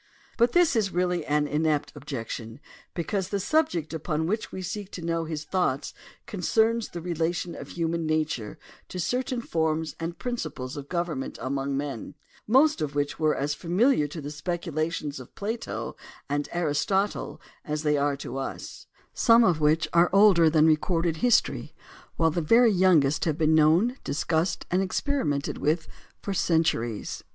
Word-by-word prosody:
But 235 0 +3
this 350 -6 +4
is 210 -4 +1
really 180 -1 0
an 150 0 +2
inept 150 -1 0
objection 120 -4 -6 0.4
because 185 +2 -2
the 200 - -1
subject 185 - 0
upon 160 0 -2
which 215 +6 -2
we 190 - -6
seek 200 +2 -5
to 170 - -6
know 165 -1 -1
his 155 -2 -4
thoughts 150 -5 -1 0.3
concerns 220 +3 +1
the 170 - -7
relation 170 0 -2
of - - -8
human 165 -1 -2
nature 155 -8 -1 0.3
to 180 - -6
certain 250 +7 -1
forms 160 -5 -1
and 170 +1 -4
principles 155 - -4
of 145 -1 -8
government 170 -6 -3
among 135 +1 -2
men, 140 -2 -5 0.3
most 270 - +4
of 145 -1 -3
which 145 +1 -1
were 155 -1 +2
as 145 +2 -1
familiar 180 - +2
to 155 +2 -7
the 145 +1 -6
speculations 155 -2 -3
of 130 - -13
Plato 220 +3 -4 0.3
and 145 +1 -2
Aristotle 175 +5 -1 0.2
as 150 0 -3
they 150 -1 +2
are 145 0 +1
to 135 -1 -6
us; 135 - -6 0.3
some 235 0 +5
of 175 -7 +2
which 155 +2 +3
are 170 +1 +5
older 195 -5 +6
than 155 0 +4
recorded 165 +1 +2
history 245 +3 +1 0.4
while 165 -1 +2
the 170 - -1
very 230 +8 +5
young 185 -6 +5
est 135 +3 0
have 155 -3 0
been 160 -1 +3
known, 165 - +4
discussed, 160 +3 -1
and 180 +2 +2
experimented 185 - -1
with 160 +2 0 0.4
for 200 - -2
centuries. 160 - 0
165 Hz, 160 wpm, -26 LUFS, 150-185 Hz, 0.4 s, older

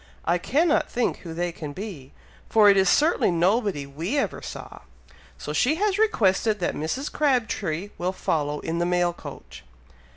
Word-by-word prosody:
I 175 +1 +2
cannot 305 - +1
think 245 - -1
who 165 -2 -9
they 175 +1 -1
can 150 -3 -7
be, 175 -8 -8 0.4
for 210 -2 +6
it - - +3
is 190 -1 +4
certainly 310 - +3
nobody 185 - +1
we 165 - -3
ever 280 - -1
saw; - - -8 0.6
so - - -6
she 280 +5 +2
has 405 +2 0
requested 220 - +2
that 175 - -1
Mrs. 210 - -3
Crabtree 210 - 0
will 180 +1 0
follow 150 -5 -2
in 165 +1 -3
the 175 - +1
mail 175 -1 +1
coach." - - -11
190 Hz, 165 wpm, -25 LUFS, 170-245 Hz, 0.6 s, for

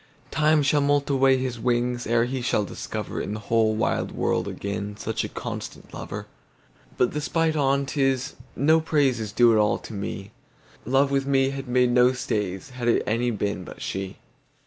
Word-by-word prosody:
Time 155 -1 +3
shall 145 +1 +3
moult 145 0 +2
away 135 -1 +4
his 130 -2 -3
wingsEre 120 -1 +1
he 130 +1 -3
shall 115 -4 +1
discoverIn 105 +1 -5
the - - -5
whole 110 0 +2
wide - - 0
world - - 0
againSuch 105 +2 -4
a - - -4
constant - - -7
lover. - - -6 0.7
But 125 - +2
the 150 - -2
spite 160 +1 +1
on 140 -1 +2
't 140 +1 -2
is, 135 -1 +1 0.2
no 160 +4 +4
praiseIs 135 -9 +1
due 120 -1 +6
at 110 - +4
all 105 -1 +3
to - - -10
me:Love 110 +7 -3
with 135 0 0
me 135 -1 +3
had 135 -1 -6
made 125 0 +3
no 125 +1 +5
stays, 105 -3 -3
Had 125 -1 -4
it 120 - +3
any 115 +3 +1
been 100 -4 -2
but - - -11
she. 95 0 -4
125 Hz, 170 wpm, -25 LUFS, 110-135 Hz, 0.7 s, due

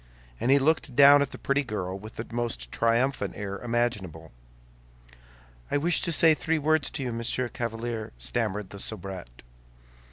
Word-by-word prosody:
And 120 - -1
he 140 - +6
looked 140 -2 +1
down 140 +1 +8
at 140 - 0
the - - -9
pretty 140 +1 0
girl 95 -7 -4
with 110 +2 -11
the 115 - -5
most 115 - -3
triumphant 120 +4 0
air 100 -1 -5
imaginable. 105 -10 -2 1.4
"I - - +1
wish 165 +4 +2
to 170 - 0
say 160 0 +6
three 160 +1 0
words 155 -1 +1
to 145 - -4
you, 125 -2 -3
Monsieur 115 +2 -1
Chevalier," 115 -1 -4
stammered 95 - -3
the 100 - -9
soubrette. 95 - -5
120 Hz, 160 wpm, -27 LUFS, 100-140 Hz, 1.4 s, down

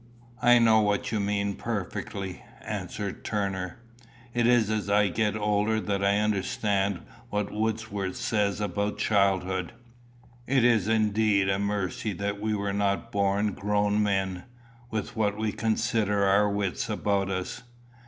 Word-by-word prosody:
"I 120 0 +6
know 115 -2 +5
what 105 -1 0
you 110 - 0
mean 100 0 0
perfectly," 100 -3 -4 0.2
answered 100 -2 -5
Turner. 95 -4 -2 0.6
"It 120 -1 +2
is 120 -3 +4
as 105 -2 -1
I 105 0 +4
get 105 +2 0
older 105 +1 +1
that 100 -2 -2
I 100 +1 +3
understand 100 -2 0 0.3
what 105 -2 -2
Wordsworth 105 -3 -2
says 105 -4 0
about 105 +1 -2
childhood. 95 -3 +1 0.7
It 130 -2 +3
is 115 -5 +3
indeed 105 -2 +2
a 95 0 +1
mercy 100 +1 -2
that 100 +2 -3
we 110 0 0
were 100 -1 -2
not 100 -1 0
born 100 +1 +1
grown 105 +1 +1
men, 95 -3 -1 0.4
with 110 0 -4
what 105 -2 0
we 110 -1 -1
consider 110 -2 0
our 100 +2 +4
wits 100 -2 -2
about 100 -1 0
us. 95 +5 -3
105 Hz, 140 wpm, -27 LUFS, 100-110 Hz, 0.7 s, I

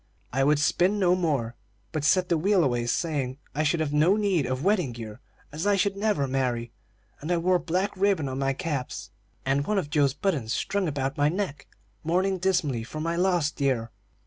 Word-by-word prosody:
I 135 +1 +2
would 150 +2 +4
spin 180 +7 +2
no 180 -3 +3
more, 140 -10 -1 0.4
but 155 - -3
set 180 +4 +3
the 170 - +2
wheel 190 +1 +3
away, 120 -4 0
saying 135 -2 -1 0.2
I 150 - 0
should 155 +2 +1
have 150 -2 -1
no 160 +6 +4
need 195 -9 +1
of 130 +2 -2
wedding 180 - +1
gear, 110 -1 -8 0.3
as 160 +7 -3
I 205 - +4
should 195 0 +1
never 200 -9 0
marry; 125 -3 -1 0.5
and 155 +4 -4
I 175 - +3
wore 180 +2 +2
black 185 +5 -1
ribbon 195 -6 +1
on 130 0 -4
my 135 0 +1
caps, 145 -4 -4 0.3
and 140 +2 +1
one 210 - +1
of 155 -6 -2
Joe's 140 -3 +2
buttons 140 - -1
strung 200 -2 -1
about 135 -2 -2
my 145 +1 +4
neck, 160 -6 -3 0.4
mourning 185 +4 +1
dismally 170 -10 0
for 155 +7 -7
my 165 +2 -1
lost 175 -4 +1
dear. 130 -5 0
155 Hz, 200 wpm, -26 LUFS, 135-185 Hz, 0.5 s, would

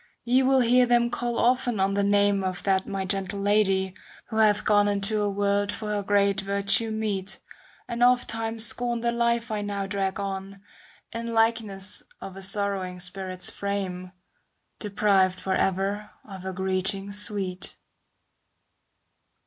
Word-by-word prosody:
Ye 250 +2 +3
will 265 0 +4
hear 245 +1 +4
them 240 0 +3
call 240 0 -2
often 245 -2 +2
on 195 +1 +2
the 200 0 +1
name 200 -1 +2
Of 185 -1 -3
that 190 -1 +1
my 195 -1 -3
gentle 195 +1 -2
Lady, 195 -2 +2 0.4
who 220 - -4
hath 210 -1 +3
gone 205 -1 +4
^° - - +2
Into 205 +1 +2
a 205 - +1
world 200 0 0
for 215 0 -5
her 210 -1 -1
great 200 0 +2
virtue 200 +3 +1
meet. 205 -3 -3 0.5
And 235 0 -4
ofttimes 225 -2 +2
scorn 240 -1 -1
the 235 0 +1
life 235 -1 0
I 210 -1 -1
now 200 -1 -3
drag 195 -1 -2
on, 195 0 -5 0.5
In 230 0 -4
likeness 215 -3 0 0.2
of 190 - -9
a 195 - -9
sorrowing 195 -2 0
spirit's 185 0 -2
frame. 190 -2 -4 0.7
Deprived 195 -3 +2
for 190 - -2
ever 195 +3 -1 0.2
of 190 -3 -9
her 190 0 -5
greeting 190 +1 0
sweet. 200 -3 -1
200 Hz, 150 wpm, -26 LUFS, 195-220 Hz, 0.7 s, will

